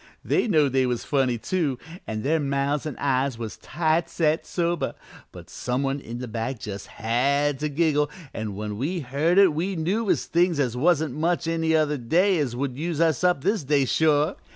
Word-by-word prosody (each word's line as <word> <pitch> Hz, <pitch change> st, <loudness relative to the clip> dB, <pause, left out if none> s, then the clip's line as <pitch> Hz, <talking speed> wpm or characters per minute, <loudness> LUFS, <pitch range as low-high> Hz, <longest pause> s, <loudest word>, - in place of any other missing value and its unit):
They -, -, +1 dB
knowed 150 Hz, -, +3 dB
they 130 Hz, -1 st, +3 dB
was 125 Hz, -1 st, -2 dB
funny, 130 Hz, -4 st, +1 dB
too, 145 Hz, +1 st, -1 dB, 0.3 s
an' 110 Hz, -1 st, -4 dB
their 160 Hz, +3 st, +2 dB
mouths 140 Hz, +1 st, -1 dB
an' 145 Hz, -, -5 dB
eyes 135 Hz, -2 st, 0 dB
was 115 Hz, -2 st, -6 dB
tight 160 Hz, +1 st, 0 dB
set 160 Hz, -1 st, 0 dB
sober, 170 Hz, -1 st, -1 dB, 0.4 s
but -, -, -12 dB
some 125 Hz, +2 st, -2 dB
one 135 Hz, +1 st, -1 dB
in 120 Hz, -3 st, -7 dB
the 125 Hz, 0 st, -5 dB
back 115 Hz, +3 st, -3 dB
just 100 Hz, -2 st, -6 dB
had 135 Hz, +5 st, 0 dB
to 150 Hz, -, -1 dB
giggle, 150 Hz, -1 st, +1 dB, 0.2 s
an' 110 Hz, -3 st, -4 dB
when 105 Hz, 0 st, -5 dB
we 170 Hz, +7 st, -2 dB
heard 145 Hz, +7 st, 0 dB
it 195 Hz, -5 st, +6 dB
we 180 Hz, +6 st, -2 dB
knew 195 Hz, +7 st, -1 dB
as -, -, +1 dB
things 170 Hz, -2 st, +2 dB
as 125 Hz, -4 st, 0 dB
wasn't 155 Hz, 0 st, +2 dB
much 165 Hz, +3 st, 0 dB
any 165 Hz, -1 st, +1 dB
other 150 Hz, -2 st, +2 dB
day 170 Hz, +7 st, +2 dB
would 130 Hz, +1 st, -3 dB
use 165 Hz, -1 st, -2 dB
us 165 Hz, -1 st, +2 dB
up 180 Hz, -6 st, +2 dB
this 200 Hz, -1 st, +1 dB
day, 140 Hz, 0 st, +2 dB
sure. 155 Hz, +4 st, +2 dB
145 Hz, 195 wpm, -25 LUFS, 130-165 Hz, 0.4 s, it